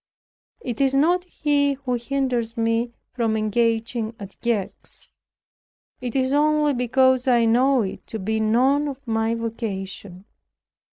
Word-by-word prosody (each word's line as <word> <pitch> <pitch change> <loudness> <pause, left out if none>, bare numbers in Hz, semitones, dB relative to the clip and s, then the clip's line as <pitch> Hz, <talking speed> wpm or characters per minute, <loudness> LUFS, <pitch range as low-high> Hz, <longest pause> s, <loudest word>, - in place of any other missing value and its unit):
It 245 - -4
is 270 0 +2
not 350 +6 +3
he 290 -4 +1
who 265 -2 -4
hinders 245 -2 -2
me 230 +1 0 0.2
from 225 -3 0
engaging 225 +1 0
at 200 -1 -9
Gex. 230 -5 -4 0.9
It 250 0 -4
is 260 0 +1
only 300 0 +3
because 260 +1 +2
I 240 -2 +4
know 250 +2 +3
it 190 - -7
to 225 - -5
be 220 +2 -2
none 260 +7 +2
of 275 -1 -7
my 225 0 0
vocation." 200 -4 -6
240 Hz, 130 wpm, -23 LUFS, 225-270 Hz, 0.9 s, I